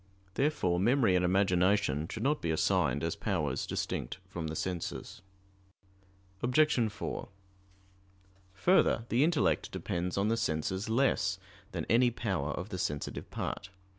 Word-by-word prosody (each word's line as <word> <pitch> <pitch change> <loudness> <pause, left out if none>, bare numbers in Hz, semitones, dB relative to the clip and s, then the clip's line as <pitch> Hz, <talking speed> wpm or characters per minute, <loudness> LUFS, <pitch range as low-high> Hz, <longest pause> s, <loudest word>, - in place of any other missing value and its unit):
Therefore 135 - +1
memory 115 -1 +3
and 90 - +3
imagination 90 -4 +2
should - - -4
not 150 +3 +1
be 85 - -2
assigned 80 -4 +1
as 80 0 -1
powers - - -1
distinct - - -3
from 85 -4 -5
the 80 - -4
senses. 90 0 -4 1.2
Obj. 125 -2 +3
4: - - -5 1.3
Further, 170 - +3
the 125 +4 +3
intellect 165 0 +1
depends 90 +1 -3
on 100 +1 +2
the 115 +1 +1
senses 95 +5 -1
less 130 +4 +2 0.3
than - - -3
any 120 +3 +4
power 95 - -2
of 90 +6 -4
the 95 - -5
sensitive 75 -6 -3
part. 100 - -4
95 Hz, 135 wpm, -31 LUFS, 85-120 Hz, 1.3 s, any